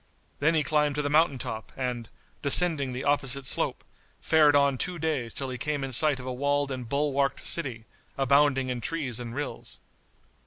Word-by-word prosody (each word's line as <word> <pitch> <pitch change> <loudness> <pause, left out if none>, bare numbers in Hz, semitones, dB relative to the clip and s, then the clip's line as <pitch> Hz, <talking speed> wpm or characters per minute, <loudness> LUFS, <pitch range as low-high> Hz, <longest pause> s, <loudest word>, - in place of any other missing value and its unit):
Then 160 +3 +2
he 155 - +2
climbed 150 0 +1
to 150 - -1
the 145 - -2
mountain 155 -2 +3
top, 110 -2 -6
and, 125 -3 -4 0.3
descending 145 -2 +3
the 125 +1 -5
opposite 140 -2 0
slope, - - 0 0.4
fared 150 -2 +4
on 140 -2 +3
two 180 -1 -1
days 150 -7 -2
till 135 -2 -4
he 125 - -6
came 145 +1 -2
in 135 -1 -5
sight 145 +2 +4
of 125 - -8
a 130 - -4
walled 140 +2 0
and 125 -3 -6
bulwarked 140 0 0
city, 125 -9 -1 0.3
abounding 135 -1 +3
in 125 -1 -3
trees 135 -4 -3
and 120 -1 -7
rills. 145 0 -6
140 Hz, 185 wpm, -27 LUFS, 125-150 Hz, 0.4 s, fared